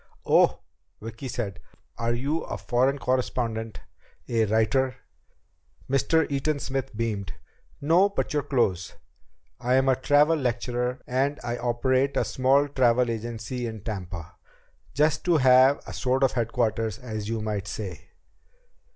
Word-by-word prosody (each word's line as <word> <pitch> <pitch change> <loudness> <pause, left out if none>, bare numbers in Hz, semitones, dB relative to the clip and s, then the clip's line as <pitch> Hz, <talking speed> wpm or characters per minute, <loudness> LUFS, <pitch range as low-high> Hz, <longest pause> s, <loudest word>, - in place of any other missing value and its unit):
"Oh?" - - +4 0.4
Vicki 115 +4 -7
said. 105 -7 -4 0.4
"Are 115 +1 -1
you 145 +6 -1
a - - -5
foreign 130 +3 +1
correspondent? 120 -4 -2 0.5
A 115 -2 +2
writer?" 120 +5 +1 0.9
Mr. 150 +4 +2
Eaton 140 +2 0
Smith 135 -5 -4
beamed. 105 -6 -2 0.5
"No, 170 +7 +4
but 200 - -2
you're 150 - +1
close. 120 -11 -1 0.6
I'm 130 +2 +2
a 130 - +4
travel 145 +4 +3
lecturer, 125 -1 -2
and 135 +3 0
I 120 0 -2
operate 130 +3 +1
a - - +2
small 135 +2 +2
travel 125 -3 +2
agency 115 +2 -4
in 110 -2 -7
Tampa. 90 -5 -6 0.6
Just 150 +2 +2
to 175 -2 +4
have 130 +1 +5
a 105 - -8
sort 130 +7 0
of 135 - +4
headquarters, 115 -2 -1
as 110 -5 -6
you 115 0 -1
might 105 -2 -3
say." 100 -1 -6
125 Hz, 135 wpm, -26 LUFS, 110-135 Hz, 0.9 s, have